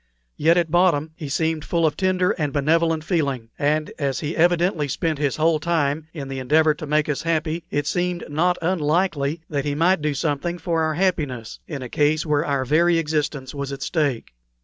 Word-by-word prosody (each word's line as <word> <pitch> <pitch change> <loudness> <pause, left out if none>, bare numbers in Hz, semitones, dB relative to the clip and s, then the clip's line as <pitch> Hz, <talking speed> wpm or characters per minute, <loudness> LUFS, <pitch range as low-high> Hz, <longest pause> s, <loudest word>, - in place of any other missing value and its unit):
yet 165 +3 +3
at 170 -3 +1
bottom 170 -3 +3
he 150 -3 -7
seemed 160 +1 0
full 170 -1 +1
of 150 -2 +1
tender 185 +1 +1
and 150 -4 -2
benevolent 160 +3 +1
feeling; 140 - -1
and 150 +2 +1
as 140 -3 -1
he 155 +1 -3
evidently 170 -2 +2
spent 155 +2 -2
his 145 -3 0
whole 160 0 +2
time 155 -2 0
in 145 -5 -6
the 135 0 -5
endeavor 155 +4 +3
to 150 +1 -8
make 150 +1 +1
us 150 -2 -1
happy, 165 0 -1
it 145 0 -1
seemed 175 +2 -1
not 175 +4 +1
unlikely 160 -2 0
that 145 -3 -2
he 145 0 -2
might 170 +3 +3
do 150 -1 -1
something 160 +4 -1
for 165 -1 -1
our 160 -1 0
happiness 150 - -1
in 140 -5 -5
a - - -5
case 150 +5 +1
where 150 -1 +1
our 140 -2 -1
very 165 +5 +3
existence 150 -4 -2
was 140 -1 -4
at 140 0 -5
stake. 145 - -1
155 Hz, 195 wpm, -22 LUFS, 145-170 Hz, -, yet